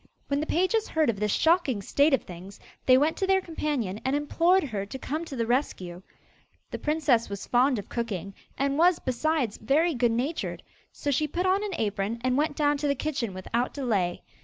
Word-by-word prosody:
When 280 0 +1
the 310 - -2
pages 375 +6 +1
heard 310 -6 +2
of 200 - -9
this 210 0 0
shocking 320 - +2
state 285 +9 +3
of - - -7
things, 185 +3 -11 0.3
they 255 0 +7
went 300 +4 +2
to 385 - 0
their 385 0 +4
companion 290 - -3
and 265 +2 0
implored 340 +5 +2
her 215 -8 -3
to 205 +6 -7
come 310 +5 -4
to 285 - -7
the 230 -2 -1
rescue. 190 -8 -2 0.7
The - - -4
princess 295 -7 +1
was 200 0 -6
fond 250 +1 +3
of 200 - -6
cooking, 200 -5 -4 0.2
and 275 +2 0
was, 355 +1 +5
besides, 255 -2 -1
very 305 +9 +2
good 240 -3 +2
natured; 260 +8 -2 0.3
so 285 - -3
she 305 +3 +1
put 350 +5 -2
on 380 +2 +2
an 405 -4 -3
apron 210 +1 -1
and 255 0 +1
went 295 +1 +1
down 290 -1 +2
to 290 - -1
the 280 - +1
kitchen 255 -6 -2
without 225 +7 -2
delay. 205 -11 -1
275 Hz, 205 wpm, -27 LUFS, 225-315 Hz, 0.7 s, they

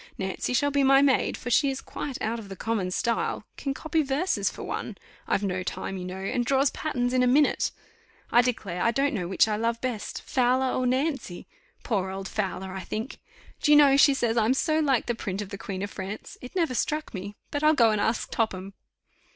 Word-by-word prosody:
Nancy 190 +5 -3
shall 285 +3 +2
be 280 0 +2
my 270 +1 +6
maid, 270 -2 +2
for 245 - -5
she 280 +3 +4
is 265 0 -3
quite 275 -3 -6
out 230 +2 -1
of 205 -3 -10
the 195 - -6
common 205 -2 -1
style; 230 +5 -1
can 275 - -3
copy 315 +3 0
verses 290 +6 0
for - - -9
one - - -5 0.3
I've 200 - +1
no 185 -2 -1
time, 190 +1 -4
you 180 -1 -5
know 185 0 -5
and 195 +6 -1
draws 270 +2 +2
patterns 245 -5 -2
in 255 - +3
a 250 - +4
minute. 285 +4 +3 0.6
I 240 - +7
declare 210 -8 -2
I - - +3
don't 275 +4 +1
know 180 -6 -2
which 190 +4 +3
I 210 -1 0
love 230 +1 0
best 245 -4 -4
Fowler 255 +1 +2
or 255 - +1
Nancy 260 - -1 0.4
poor 195 -5 -1
old 190 0 -5
Fowler, 190 -3 -3
I 190 - -4
think. 225 +6 -5 0.4
Do 295 - +3
you 295 - +9
know 280 -2 +7
she 280 0 +6
says 235 -3 0
I'm 230 +3 +3
so 310 +2 +1
like 275 -6 +2
the 240 - 0
print 195 -4 -4
of 205 -2 -4
the 200 - -6
Queen 190 -1 -5
of 205 - -4
France. 195 +2 -7
It 250 - -10
never 330 -7 +1
struck 305 +4 -2
me; 200 +1 -6 0.2
but 290 - -2
I'll 310 +1 +5
go 230 -4 +5
and 210 -1 0
ask 225 +2 -1
Topham." 195 -3 -2
240 Hz, 225 wpm, -27 LUFS, 200-275 Hz, 0.6 s, you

